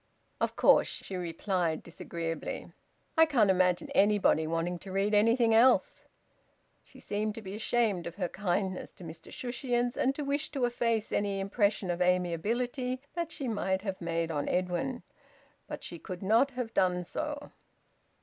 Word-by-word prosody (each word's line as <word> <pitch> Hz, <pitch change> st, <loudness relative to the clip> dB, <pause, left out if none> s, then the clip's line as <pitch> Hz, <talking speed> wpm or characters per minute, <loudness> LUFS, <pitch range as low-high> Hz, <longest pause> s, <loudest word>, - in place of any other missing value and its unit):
"Of -, -, -1 dB
course," -, -, +5 dB
she 190 Hz, -, -5 dB
replied 175 Hz, -1 st, -1 dB
disagreeably. 165 Hz, -1 st, -5 dB, 0.4 s
"I 320 Hz, 0 st, +6 dB
can't 230 Hz, -10 st, +4 dB
imagine 180 Hz, -1 st, +2 dB
anybody 200 Hz, -6 st, +3 dB
wanting 165 Hz, +2 st, -1 dB
to 190 Hz, -, -9 dB
read 195 Hz, +2 st, +1 dB
anything 230 Hz, +2 st, +4 dB
else." 240 Hz, +4 st, +4 dB, 0.8 s
She -, -, -17 dB
seemed 210 Hz, +1 st, -2 dB
to 225 Hz, -, -7 dB
be 190 Hz, 0 st, -7 dB
ashamed 215 Hz, -4 st, 0 dB
of 170 Hz, -, -7 dB
her 185 Hz, -3 st, -1 dB
kindness 190 Hz, 0 st, -2 dB
to -, -, -13 dB
Mr 160 Hz, 0 st, -10 dB
Shushions, 245 Hz, 0 st, -1 dB
and 270 Hz, +1 st, +1 dB
to 295 Hz, -, -4 dB
wish 285 Hz, +2 st, -1 dB
to 265 Hz, -4 st, +1 dB
efface 230 Hz, -2 st, 0 dB
any 200 Hz, -1 st, 0 dB
impression 200 Hz, -1 st, +1 dB
of 175 Hz, +1 st, -3 dB
amiability 225 Hz, -, 0 dB
that 340 Hz, -1 st, -3 dB
she 275 Hz, -4 st, -4 dB
might 190 Hz, -4 st, -1 dB
have 195 Hz, -3 st, -4 dB
made 165 Hz, -1 st, -1 dB
on 145 Hz, -2 st, -2 dB
Edwin. 185 Hz, +8 st, -1 dB, 0.6 s
But -, -, -7 dB
she 170 Hz, -, -7 dB
could 185 Hz, +2 st, -7 dB
not 225 Hz, +8 st, +4 dB
have 250 Hz, -3 st, -5 dB
done 180 Hz, -1 st, +2 dB
so. 295 Hz, -, -4 dB
200 Hz, 160 wpm, -30 LUFS, 180-240 Hz, 0.8 s, I